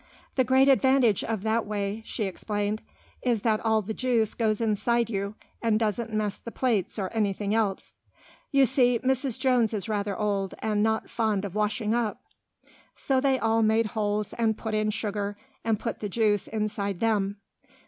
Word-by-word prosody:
"The 260 - +3
great 260 +2 +4
advantage 265 -5 +4
of 220 -3 -3
that 225 +1 +1
way," 205 +1 -2
she 220 - -3
explained, 205 +2 -2 0.4
"is 235 -5 0
that 220 -2 +2
all 220 -1 +1
the 220 +3 -4
juice 235 -3 +1
goes 215 -2 0
inside 230 +1 +1
you, 200 0 -2 0.3
and 225 -2 +2
doesn't 225 +1 -1
mess 215 -2 -1
the - - -8
plates 230 -8 0
or 195 -1 -3
anything 205 -2 0
else. 215 -4 -1 0.5
You 275 -1 +5
see, 245 -1 +3
Mrs. 260 -1 0
Jones 250 -4 +2
is 205 - -3
rather 205 -2 -1
old, 200 -2 -1
and 210 -1 0
not 220 0 +1
fond 215 -4 0
of 195 - -6
washing 210 +1 0
up." 235 -3 -1 0.8
So 265 -1 0
they 270 -1 +3
all 225 -2 +2
made 220 +1 +3
holes 210 -1 -1
and 220 -2 +1
put 220 -1 -4
in 215 0 +1
sugar, 205 -1 -2 0.3
and 220 -2 +1
put 230 - -4
the 210 - -4
juice 210 -1 +1
inside 205 -3 -2
them. 205 -3 +1
220 Hz, 175 wpm, -27 LUFS, 205-230 Hz, 0.8 s, You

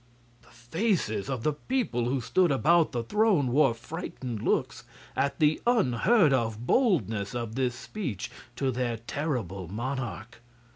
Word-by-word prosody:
The - - -23
faces 120 - -1
of 130 -4 -3
the 155 - +2
people 150 - -1
who 130 +2 0
stood 175 +7 +2
about 160 +4 +3
the 120 -2 -2
throne 200 - +2
wore 135 -3 +4
frightened 125 - -6
looks - - 0 0.3
at 140 0 0
the 150 0 +2
unheard 200 - +4
of 115 -2 -1
boldness 115 - +1
of 115 -2 -3
this 125 -1 0
speech 125 - -5 0.2
to 135 -1 0
their 120 -2 -1
terrible 115 - -3
monarch. 120 +1 -5
130 Hz, 140 wpm, -28 LUFS, 115-160 Hz, 0.3 s, wore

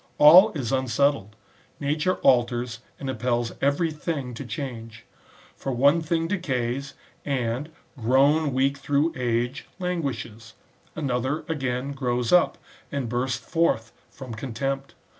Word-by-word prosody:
All 180 +9 +9
is 130 -7 -3
unsettled; 130 -4 +1 0.4
nature 150 +5 0
alters 120 -1 +2 0.2
and 135 - -5
impels 120 -2 -1
every 145 +4 +2
thing 150 -5 -4
to 120 - -6
change. 115 -4 -7 0.5
For 135 - -4
one 140 +7 +4
thing 165 +1 0
decays, 135 -7 -2 0.3
and, 130 +1 -2 0.3
grown 140 +5 +3
weak 135 +2 +1
through 145 +4 +1
age, 120 +1 -1
languishes; 125 - -4 0.4
another, 135 0 -1
again, 135 -3 -2
grows 125 -3 -1
up, 180 - +4 0.3
and 140 -3 -2
bursts 125 +2 -1
forth 115 -9 +1 0.2
from 130 -4 -9
contempt. 135 +4 -4
135 Hz, 120 wpm, -25 LUFS, 120-150 Hz, 0.5 s, All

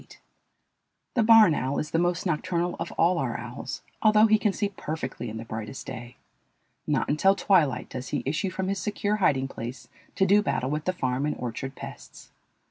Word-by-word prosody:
The 240 - +2
barn 220 -5 +7
owl 135 -1 -1
is 150 - -3
the 165 - +2
most 175 +1 0
nocturnal 175 +1 -1
of 165 - -4
all 175 +1 +2
our - - -1
owls, - - -7 0.2
although 215 0 +6
he 215 -1 +4
can 210 -2 +2
see 205 +1 -1
perfectly 150 - -5
in 110 - -6
the 115 - -7
brightest 110 +2 -6
day. 120 0 -8 0.7
Not - - +1
until 190 +7 +3
twilight 170 -9 +2
does 130 0 -6
he - - -2
issue 155 +8 -1
from 185 +1 -3
his 195 0 -1
secure 205 +2 -1
hiding 135 -9 +2
place 120 -1 -7 0.3
to 190 - +3
do 200 +2 +5
battle 135 -9 -1
with 150 +1 -2
the 185 - +1
farm 130 -2 -1
and 150 - -1
orchard 130 +3 -5
pests. - - -11
165 Hz, 190 wpm, -26 LUFS, 130-195 Hz, 0.7 s, barn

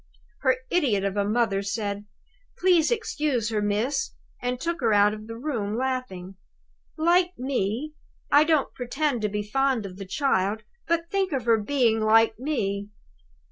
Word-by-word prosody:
Her 260 -1 +2
idiot 245 - +2
of 200 0 -1
a 205 - +1
mother 210 -1 +1
said, 200 0 -3 0.5
'Please 355 -4 +4
to 475 - +3
excuse 285 - -1
her, 215 -1 0
miss,' 220 - -1 0.3
and 245 0 -2
took 340 +1 -3
her 225 -3 +3
out 205 0 +5
of 215 0 -9
the 230 0 -7
room, 230 -6 -2
laughing. 240 -8 -3 0.6
Like 350 +3 +2
me! 255 +2 -2 0.4
I 290 +1 +7
don't 310 -3 +1
pretend 255 0 -1
to 210 - 0
be 210 +1 -2
fond 260 +1 0
of 185 -1 -8
the 195 -1 -8
child; 215 -4 0 0.2
but 335 0 0
think 390 -2 0
of 260 -4 -2
her 230 -2 +4
being 230 0 +2
like 220 +1 +4
me!" 205 -8 -2
235 Hz, 165 wpm, -25 LUFS, 205-290 Hz, 0.6 s, I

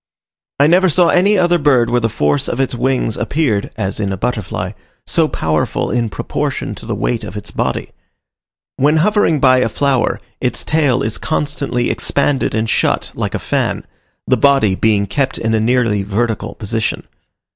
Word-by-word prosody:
I 140 - +6
never 180 +4 +4
saw 170 +2 +4
any 200 +4 +3
other 175 -1 +3
bird 130 -6 +3
where 120 - +3
the 115 - +1
force 75 -7 0
of 120 - -3
its 135 -1 0
wings 125 -2 0
appeared 125 -10 0
(as 100 -3 -3
in 100 -2 -1
a 95 - -3
butterfly) 100 -4 -3 0.3
so 165 -2 +2
powerful 80 - -1
in 120 -2 0
proportion - - -3
to - - -11
the - - -2
weight - - -1
of - - -7
its - - -7
body. - - -2 0.9
When 150 +4 +3
hovering 190 -3 +2
by 130 -1 +5
a 125 - +1
flower, 135 +1 0 0.2
its 125 - -1
tail 140 -5 +1
is 110 - -3
constantly 145 -5 -1
expanded 140 -3 0
and 110 +1 0
shut - - 0
like - - -3
a - - +1
fan, - - -2 0.4
the - - +2
body 135 -8 +3
being 105 +1 +2
kept 135 +5 -1
in 110 0 -1
a 110 - +2
nearly 115 -2 +1
vertical 110 +3 -2
position. 110 +2 -3
125 Hz, 175 wpm, -17 LUFS, 110-145 Hz, 0.9 s, I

